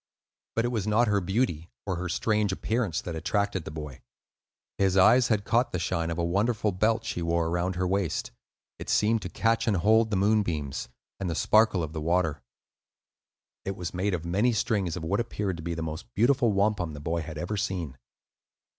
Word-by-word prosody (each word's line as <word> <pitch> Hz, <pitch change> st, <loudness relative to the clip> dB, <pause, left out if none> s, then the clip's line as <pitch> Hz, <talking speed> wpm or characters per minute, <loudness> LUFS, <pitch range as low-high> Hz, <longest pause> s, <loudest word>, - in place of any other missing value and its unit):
But 115 Hz, -, +1 dB
it -, -, +1 dB
was 110 Hz, -4 st, -2 dB
not 115 Hz, +3 st, +3 dB
her 100 Hz, -1 st, +2 dB
beauty 90 Hz, -4 st, -1 dB, 0.2 s
or 95 Hz, -3 st, -2 dB
her 90 Hz, 0 st, -3 dB
strange 105 Hz, +3 st, +1 dB
appearance 105 Hz, -2 st, -1 dB
that 85 Hz, -, -5 dB
attracted 95 Hz, +2 st, -1 dB
the -, -, -5 dB
boy; 75 Hz, -4 st, -8 dB, 0.8 s
his 95 Hz, -1 st, +2 dB
eyes 120 Hz, +6 st, +6 dB
had 105 Hz, -3 st, +1 dB
caught 120 Hz, +2 st, +1 dB
the -, -, 0 dB
shine 85 Hz, -1 st, -1 dB
of 85 Hz, -, -3 dB
a 85 Hz, -, 0 dB
wonderful 105 Hz, +4 st, +1 dB
belt 110 Hz, +4 st, +1 dB
she 90 Hz, -, -3 dB
wore 85 Hz, 0 st, +1 dB
around 90 Hz, +2 st, -1 dB
her 90 Hz, +1 st, 0 dB
waist. 95 Hz, -2 st, -1 dB, 0.5 s
It -, -, -7 dB
seemed 110 Hz, +1 st, +2 dB
to 90 Hz, -, -5 dB
catch 115 Hz, +4 st, +1 dB
and 105 Hz, -4 st, +3 dB
hold 110 Hz, +5 st, +4 dB
the 105 Hz, -, 0 dB
moonbeams 90 Hz, -, 0 dB, 0.3 s
and 95 Hz, -2 st, -2 dB
the 85 Hz, -, -2 dB
sparkle 110 Hz, -3 st, +3 dB
of 80 Hz, 0 st, -5 dB
the 80 Hz, -, -4 dB
water. 80 Hz, -4 st, 0 dB, 1.2 s
It 95 Hz, -, -3 dB
was 90 Hz, -2 st, -5 dB
made 95 Hz, +1 st, 0 dB
of 85 Hz, -1 st, -6 dB
many 100 Hz, +8 st, +2 dB
strings 100 Hz, -6 st, 0 dB
of 85 Hz, -, -6 dB
what 95 Hz, +5 st, 0 dB
appeared 105 Hz, -6 st, -2 dB
to -, -, -7 dB
be 85 Hz, 0 st, -3 dB
the 80 Hz, -, -3 dB
most 80 Hz, +1 st, -6 dB
beautiful 120 Hz, +2 st, +3 dB
wampum 100 Hz, -5 st, +1 dB
the 75 Hz, -, -7 dB
boy 85 Hz, +3 st, -2 dB
had 80 Hz, 0 st, -7 dB
ever 90 Hz, +7 st, -3 dB
seen. 90 Hz, -7 st, -3 dB
95 Hz, 200 wpm, -27 LUFS, 85-110 Hz, 1.2 s, eyes